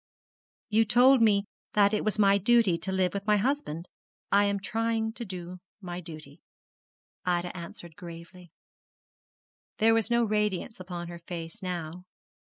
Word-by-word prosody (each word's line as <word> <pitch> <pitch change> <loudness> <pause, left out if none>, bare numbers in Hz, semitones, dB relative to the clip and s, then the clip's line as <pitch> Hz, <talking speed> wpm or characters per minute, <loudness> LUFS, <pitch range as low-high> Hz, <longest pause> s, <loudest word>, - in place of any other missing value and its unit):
'You 220 +1 +4
all - - +3
told 250 +3 +6
me 205 -2 +4 0.3
that 205 0 +4
it 210 - +1
was 215 0 0
my 200 -1 +5
duty 220 -3 +4
to 190 +3 -3
live 185 -1 +1
with 200 +1 -5
my 210 0 +4
husband. 195 - -2 0.4
I 200 +1 +5
am 200 0 0
trying 225 +2 -1
to 240 - -4
do 185 -3 -7 0.2
my 175 -3 -6
duty,' 155 -3 -11 0.8
Ida 175 0 -1
answered 170 -1 -9
gravely. 170 +1 -11 1.3
There 225 +1 +4
was 225 -1 +1
no 235 0 +3
radiance 210 -1 -1
upon 175 -2 -6
her 170 0 -8
face 170 -1 -7
now. 180 -1 -5
195 Hz, 155 wpm, -28 LUFS, 175-215 Hz, 1.3 s, told